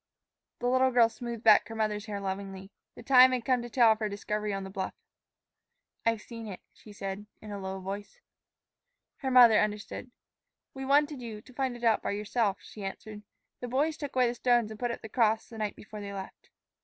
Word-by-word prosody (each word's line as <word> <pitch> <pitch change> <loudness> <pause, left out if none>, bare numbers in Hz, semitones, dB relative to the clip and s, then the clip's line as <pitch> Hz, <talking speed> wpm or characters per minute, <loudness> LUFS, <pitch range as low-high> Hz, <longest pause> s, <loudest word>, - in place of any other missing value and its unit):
The 245 - -5
little 260 +1 +4
girl 240 -2 +5
smoothed 235 0 -7
back 215 -2 +6
her 225 - -8
mother's 215 -1 -1
hair 205 -1 -4
lovingly. 195 0 -5 0.2
The - - -11
time 255 0 +7
had 245 -2 -2
come 255 -2 +2
to 240 - -7
tell 235 -2 +5
of 220 - +1
her 215 -1 -1
discovery 210 +1 -3
on 195 -1 -3
the 190 - -8
bluff. 190 -1 -4 1.1
"I've 230 -2 +1
seen 230 -2 -8
it," 190 -3 -7
she 215 - -15
said 200 0 -6
in 215 - -10
a 200 - -5
low 190 0 -5
voice. 200 - -7 1.0
Her 265 - -3
mother 245 -4 +8
understood. 210 +3 -3 0.6
"We 270 0 -6
wanted 290 0 +2
you 225 -3 -6
to 255 - -16
find 260 -1 -2
it 240 - -14
out 225 -2 +3
by - - -2
yourself," 210 -1 0
she 210 - -10
answered. 210 +2 -7 0.4
"The 245 - -5
boys 290 +6 +1
took 290 -4 -7
away 255 -1 +4
the 240 - 0
stones 240 -2 +2
and 215 - -9
put 245 - -1
up 235 - -5
the - - -6
cross 220 -1 +1
the 225 - -9
night 210 -1 -2
before 215 0 -10
they 200 0 -6
left." 195 -1 -9
220 Hz, 215 wpm, -29 LUFS, 205-245 Hz, 1.1 s, mother